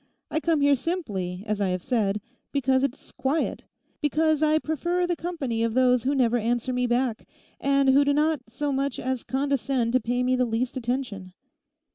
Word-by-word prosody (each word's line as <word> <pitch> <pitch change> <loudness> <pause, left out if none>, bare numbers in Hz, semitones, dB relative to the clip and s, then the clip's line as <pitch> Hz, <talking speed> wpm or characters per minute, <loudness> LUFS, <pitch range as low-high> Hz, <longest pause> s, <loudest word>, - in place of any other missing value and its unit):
I 315 - +1
come 325 -2 +1
here 285 0 +5
simply, 210 - -3
as 210 -2 -2
I 200 - +2
have 180 -1 -2
said, 210 -5 0 0.3
because 265 -2 +2
it's 275 0 -3
quiet; 280 +4 -2 0.3
because 310 0 +2
I 310 0 +4
prefer 345 +4 -1
the 350 0 0
company 295 -9 -3
of 230 0 0
those 250 -1 +3
who 280 +2 +2
never 245 -3 +3
answer 240 +3 -1
me 250 0 +1
back, 240 -1 0 0.3
and 275 -1 +3
who 275 +2 +6
do 285 - +2
not 300 0 +2
so 285 +5 -2
much 275 -1 -1
as 260 -1 -2
condescend 265 -3 0
to 255 - +5
pay 245 +2 -1
me 255 +1 +2
the 255 - +2
least 240 +3 -2
attention. 240 -7 -3
260 Hz, 185 wpm, -26 LUFS, 235-285 Hz, 0.3 s, who